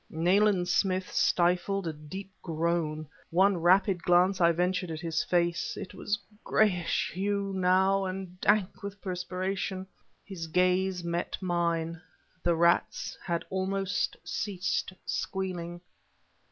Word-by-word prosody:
Nayland 180 Hz, +3 st, +3 dB
Smith 185 Hz, 0 st, +1 dB
stifled 185 Hz, +1 st, +2 dB
a 165 Hz, -, -2 dB
deep 185 Hz, +6 st, -8 dB
groan. 160 Hz, -2 st, -1 dB, 0.2 s
One 190 Hz, +3 st, +4 dB
rapid 180 Hz, +2 st, +3 dB
glance 180 Hz, +2 st, +3 dB
I 170 Hz, 0 st, +6 dB
ventured 180 Hz, +2 st, 0 dB
at 160 Hz, -1 st, -4 dB
his 165 Hz, -2 st, -1 dB
face. 175 Hz, -1 st, 0 dB
It 185 Hz, -, -7 dB
was 205 Hz, 0 st, -2 dB
a 205 Hz, +1 st, -28 dB
grayish 180 Hz, -6 st, +1 dB
hue, 200 Hz, +1 st, -1 dB
now, 190 Hz, +1 st, +3 dB
and 185 Hz, -1 st, -6 dB
dank 205 Hz, -2 st, +2 dB
with 200 Hz, 0 st, -7 dB
perspiration. 185 Hz, 0 st, -3 dB, 0.4 s
His 180 Hz, -5 st, -6 dB
gaze 180 Hz, +2 st, +2 dB
met 170 Hz, 0 st, -2 dB
mine. 170 Hz, -2 st, -1 dB, 0.4 s
The 170 Hz, -1 st, +2 dB
rats 170 Hz, +1 st, +2 dB
had 170 Hz, -2 st, -2 dB
almost 195 Hz, +1 st, -1 dB
ceased 190 Hz, -3 st, -2 dB
squealing. 175 Hz, -3 st, -3 dB
180 Hz, 125 wpm, -29 LUFS, 170-195 Hz, 0.4 s, I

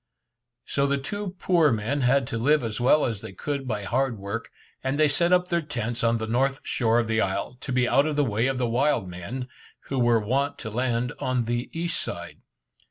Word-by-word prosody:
So 140 Hz, 0 st, +1 dB
the 140 Hz, 0 st, +1 dB
two 190 Hz, +7 st, -5 dB
poor 170 Hz, -5 st, +3 dB
men 115 Hz, +6 st, -1 dB
had 130 Hz, +1 st, +3 dB
to 115 Hz, -, -2 dB
live 145 Hz, +4 st, +3 dB
as 115 Hz, +1 st, -3 dB
well 140 Hz, +5 st, +4 dB
as 115 Hz, -4 st, -3 dB
they -, -, -8 dB
could 140 Hz, +6 st, -4 dB
by 105 Hz, -4 st, -2 dB
hard 125 Hz, +3 st, 0 dB
work, 100 Hz, +4 st, -5 dB, 0.3 s
and 130 Hz, +2 st, -1 dB
they 155 Hz, -, +6 dB
set 170 Hz, +5 st, +2 dB
up 180 Hz, 0 st, +3 dB
their 170 Hz, -1 st, +1 dB
tents 120 Hz, -6 st, -3 dB
on 115 Hz, 0 st, +3 dB
the 110 Hz, -, -3 dB
north 135 Hz, +4 st, +1 dB
shore 115 Hz, -2 st, +1 dB
of 115 Hz, -, 0 dB
the 110 Hz, 0 st, +1 dB
isle, 95 Hz, +5 st, -2 dB
to -, -, -5 dB
be 125 Hz, -1 st, +2 dB
out 140 Hz, +4 st, +3 dB
of 155 Hz, -, -1 dB
the 145 Hz, -, +3 dB
way 115 Hz, +1 st, +1 dB
of 135 Hz, -1 st, -1 dB
the 125 Hz, -1 st, 0 dB
wild 125 Hz, -3 st, +1 dB
men, 90 Hz, +9 st, -6 dB, 0.4 s
who 135 Hz, -, 0 dB
were 120 Hz, -1 st, +4 dB
wont 135 Hz, +7 st, 0 dB
to 110 Hz, -, -6 dB
land 120 Hz, +1 st, -1 dB
on 125 Hz, -2 st, 0 dB
the 120 Hz, +2 st, -2 dB
east 170 Hz, +1 st, -2 dB
side. -, -, -7 dB
125 Hz, 225 wpm, -26 LUFS, 115-140 Hz, 0.4 s, they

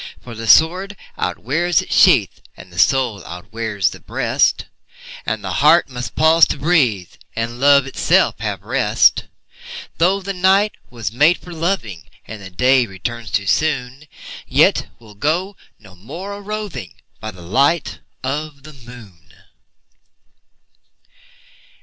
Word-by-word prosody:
For 120 Hz, -, -11 dB
the 115 Hz, 0 st, -7 dB
sword 180 Hz, -, +3 dB, 0.2 s
outwears 155 Hz, -, -1 dB
its -, -, -5 dB
sheath, -, -, +4 dB, 0.2 s
And 90 Hz, -1 st, -14 dB
the 85 Hz, -, -6 dB
soul 115 Hz, +2 st, +2 dB
outwears 105 Hz, +2 st, -3 dB
the -, -, -11 dB
breast, -, -, 0 dB, 0.6 s
And -, -, -2 dB
the -, -, -4 dB
heart -, -, +5 dB
must 125 Hz, -1 st, -7 dB
pause 160 Hz, +1 st, +5 dB
to -, -, -3 dB
breathe, 135 Hz, -, +1 dB, 0.2 s
And 115 Hz, +1 st, -4 dB
love 140 Hz, 0 st, +5 dB
itself 135 Hz, -, +1 dB
have -, -, -4 dB
rest. -, -, +2 dB, 0.7 s
Though 185 Hz, +4 st, +3 dB
the 195 Hz, 0 st, -5 dB
night 190 Hz, +3 st, +3 dB, 0.2 s
was 115 Hz, -5 st, -5 dB
made 150 Hz, +9 st, +3 dB
for 175 Hz, -, -12 dB
loving, 160 Hz, -, -3 dB, 0.2 s
And 110 Hz, -1 st, -9 dB
the 95 Hz, -, -9 dB
day 125 Hz, +6 st, +2 dB
returns 115 Hz, +4 st, -6 dB
too 100 Hz, -, -1 dB
soon, 135 Hz, +2 st, -1 dB, 0.4 s
Yet -, -, +3 dB
we'll 110 Hz, -3 st, -16 dB
go 170 Hz, -, -2 dB, 0.2 s
no 100 Hz, -3 st, -17 dB
more 175 Hz, -, -8 dB
a 200 Hz, -, -9 dB
roving 210 Hz, -, -6 dB, 0.2 s
By 110 Hz, -, -6 dB
the 90 Hz, -4 st, -12 dB
light 140 Hz, -, 0 dB, 0.2 s
of 145 Hz, +1 st, -4 dB
the 155 Hz, +1 st, -12 dB
moon. 120 Hz, -9 st, -15 dB
130 Hz, 135 wpm, -18 LUFS, 110-165 Hz, 0.7 s, heart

